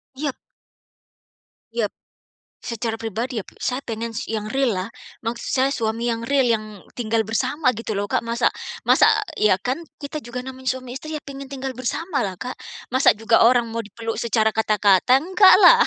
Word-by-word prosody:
Iyap. 280 0 -3 1.4
Iyap, 230 -3 0 0.7
secara 225 -1 -3
pribadi 225 +2 -3
ya - - -5
p - - -16
saya 250 +1 0
pengen 230 -3 -5
si 225 0 -4
yang 215 0 -4
real-lah, 230 -7 0 0.3
maksud 235 +1 -4
saya 265 +1 +3
suami 230 -1 -1
yang 230 0 -3
real 280 -1 +3
yang 215 -1 -6 0.3
tinggal 225 -1 +1
bersama 255 +6 +1
gitu 220 -2 -5
loh, 200 0 -2
Kak. - - +3
Masa 235 +1 +2 0.3
masa - - +5 0.3
iya, 210 -3 +5
kan 250 - -2 0.2
kita 295 +2 -4
juga 250 -1 -6
namanya 260 0 -9
suami 255 -1 -8
istri 310 +1 -6
ya 300 - -6
pengen 275 0 -8
tinggal 270 -1 -5
bersama 275 +6 -2
lah 195 -6 -2
Kak, 250 +7 -7 0.3
masa 260 -4 +5
juga 225 +2 +3
orang 240 -2 +3
mau 230 - -3
dipeluk 225 +1 -5
secara 220 -1 +2
kata-kata, 215 +1 +4
enggaklah. 380 +5 +7
235 Hz, 170 wpm, -22 LUFS, 220-265 Hz, 1.4 s, enggaklah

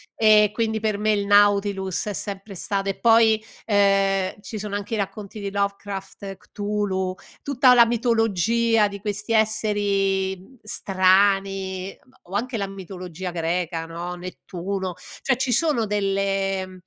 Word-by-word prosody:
ehm, 210 -1 +5
quindi 220 0 -1
per 215 -2 -1
me 215 0 +2
il 200 -1 0
Nautilus 200 -2 +3
è 205 - -2
sempre 200 +1 -6
stato 195 +2 -2
e 195 - -4
poi, 225 -2 +4 0.2
ehm, 195 -2 +2
ci 215 +1 -7
sono 205 0 -4
anche 205 +2 -4
i - - -2
racconti 200 +1 -5
di 200 -1 -4
Lovecraft, 200 -1 -4
Cthulhu, 200 -3 -3 0.3
tutta 260 -2 +4
la 235 -1 +7
mitologia 225 -1 +2
di 200 0 -8
questi 205 +2 -3
esseri, 205 -3 +1
mhmm, 245 +8 -18
strani, 195 -1 +1
uhm, 260 - -26 0.2
o - - -2
anche 240 +2 -1
la 200 -1 -2
mitologia 185 -2 -7
greca, 170 0 -2
no, 170 +2 -5
Nettuno; 185 +1 -5 0.3
cioè 265 -2 +1
ci 260 -1 -1
sono 280 -4 +2
delle 195 -1 0
mhmm, 185 - -13
200 Hz, 145 wpm, -23 LUFS, 190-215 Hz, 0.3 s, la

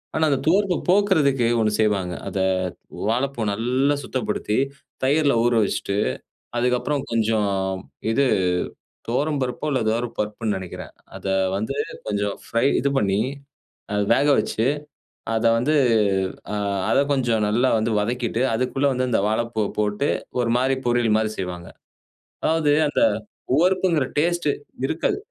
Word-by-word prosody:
ஆனா 160 - +3
அந்த 140 - +2
துவர்ப்பு 190 +2 +3
போக்குறதுக்கு 160 - +3
ஒண்ணு 110 -1 +2
செய்வாங்க. 100 -5 +1
அத 95 - -3 0.7
வாழைப்பூ 125 +1 -1
நல்லா 125 +7 +1
சுத்தப்படுத்தி 110 -4 -2 0.5
தயிர்ல 140 0 +3
ஊற 120 - +3
வச்சுட்டு, 100 0 -2 0.6
அதுக்கப்புறம் 125 +3 0
கொஞ்சம் 110 -2 +1 0.6
இது 140 +5 +2 0.8
துவரம்பருப்போ 135 +1 -1
இல்ல 130 - +1
ஏதோ 110 +1 +2 0.2
பருப்புன்னு 105 0 -2
நெனைக்கிறேன். 90 -2 -7 0.2
அத - - -9 0.3
வந்து 110 +7 -3 0.3
கொஞ்சம் 100 -1 -1
ஃப்ரை 115 +2 +1
இது 140 - +1
பண்ணி 100 0 +1 0.7
அத 105 0 +1
வேக 140 - +2
வச்சு, 110 - -2 0.7
அத 110 +1 0
வந்து 130 +7 +1 0.8
அ - - -1 0.3
அத - - +3
கொஞ்சம் 120 -5 +1
நல்லா 120 +5 +2
வந்து 110 +1 0
வதக்கிட்டு, 120 +1 -1
அதுக்குள்ள 130 +4 0
வந்து 130 0 -1
இந்த 110 - +2
வாழைப்பூவ 110 -1 -1
போட்டு 105 +6 0 0.3
ஒரு 115 -1 0
மாதிரி 130 +2 +2
பொரியல் 120 -2 +2
மாதிரி 110 0 0
செய்வாங்க. 90 -2 -5 0.8
அதாவது 155 -2 +2
அந்த 145 - 0 0.5
உவர்ப்புங்கிற 180 -2 +2
டேஸ்ட் 175 0 +1 0.4
இருக்காது. 160 +3 0
120 Hz, 125 wpm, -23 LUFS, 110-140 Hz, 0.8 s, ஆனா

